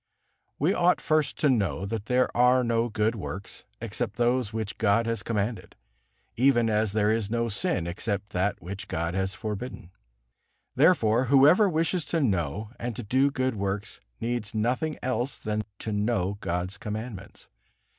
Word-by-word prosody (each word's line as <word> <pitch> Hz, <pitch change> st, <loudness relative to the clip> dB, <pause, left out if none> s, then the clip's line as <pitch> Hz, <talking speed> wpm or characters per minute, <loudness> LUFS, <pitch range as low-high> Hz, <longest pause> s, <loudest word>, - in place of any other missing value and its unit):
We 160 Hz, +7 st, +2 dB
ought 180 Hz, -1 st, +3 dB
first 155 Hz, -2 st, +1 dB
to 150 Hz, -, +4 dB
know 95 Hz, -, 0 dB
that 110 Hz, +1 st, -4 dB
there 125 Hz, 0 st, +2 dB
are 125 Hz, +1 st, +5 dB
no 115 Hz, 0 st, +1 dB
good 110 Hz, +1 st, +1 dB
works 100 Hz, -2 st, -7 dB
except 115 Hz, +1 st, -4 dB
those 120 Hz, -2 st, +1 dB
which 110 Hz, -2 st, -4 dB
God 115 Hz, +1 st, +3 dB
has 115 Hz, 0 st, -1 dB
commanded, 110 Hz, 0 st, -3 dB, 0.6 s
even 120 Hz, -3 st, +3 dB
as 105 Hz, -1 st, +1 dB
there 105 Hz, 0 st, +2 dB
is 110 Hz, -2 st, 0 dB
no 115 Hz, +1 st, 0 dB
sin 110 Hz, -, 0 dB
except 100 Hz, +3 st, -3 dB
that 95 Hz, +3 st, 0 dB
which 95 Hz, +3 st, -6 dB
God 85 Hz, -1 st, -2 dB
has 95 Hz, 0 st, -1 dB
forbidden. 105 Hz, -2 st, -6 dB, 0.8 s
Therefore 130 Hz, -6 st, +4 dB
whoever 145 Hz, -, +6 dB
wishes 165 Hz, +1 st, 0 dB
to 165 Hz, -, 0 dB
know 100 Hz, -, -1 dB
and 120 Hz, -1 st, -3 dB
to 120 Hz, -, -5 dB
do 130 Hz, +6 st, +3 dB
good 130 Hz, -2 st, -1 dB
works 100 Hz, -1 st, -4 dB, 0.2 s
needs 115 Hz, -2 st, -3 dB
nothing 125 Hz, +8 st, 0 dB
else 130 Hz, +1 st, -1 dB
than 105 Hz, 0 st, -2 dB, 0.2 s
to 110 Hz, -, -5 dB
know 105 Hz, -2 st, 0 dB
God's 90 Hz, +3 st, -3 dB
commandments. 105 Hz, -2 st, -7 dB
110 Hz, 155 wpm, -27 LUFS, 100-125 Hz, 0.8 s, whoever